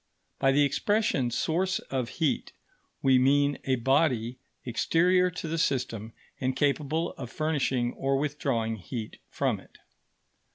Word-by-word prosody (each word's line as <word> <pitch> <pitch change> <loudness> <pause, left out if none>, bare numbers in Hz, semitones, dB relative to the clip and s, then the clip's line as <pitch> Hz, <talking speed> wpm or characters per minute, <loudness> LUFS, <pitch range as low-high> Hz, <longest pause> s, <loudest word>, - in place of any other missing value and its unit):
By 135 -1 +4
the 145 +2 +4
expression 145 - +1
"source 180 +10 0
of 130 -3 -3
heat," 160 -4 0 0.5
we 130 -1 +5
mean 140 +2 +3
a 130 - +2
body 130 -2 +1 0.3
exterior 180 +9 +3
to 175 -1 -6
the 165 +1 -2
system 115 -7 -1 0.3
and 130 0 -1
capable 150 +3 0
of 125 -3 -5
furnishing 135 -6 0
or 135 0 0
withdrawing 135 -6 -1
heat 110 +2 -7
from - - -1
it. - - -19
135 Hz, 130 wpm, -28 LUFS, 125-160 Hz, 0.5 s, we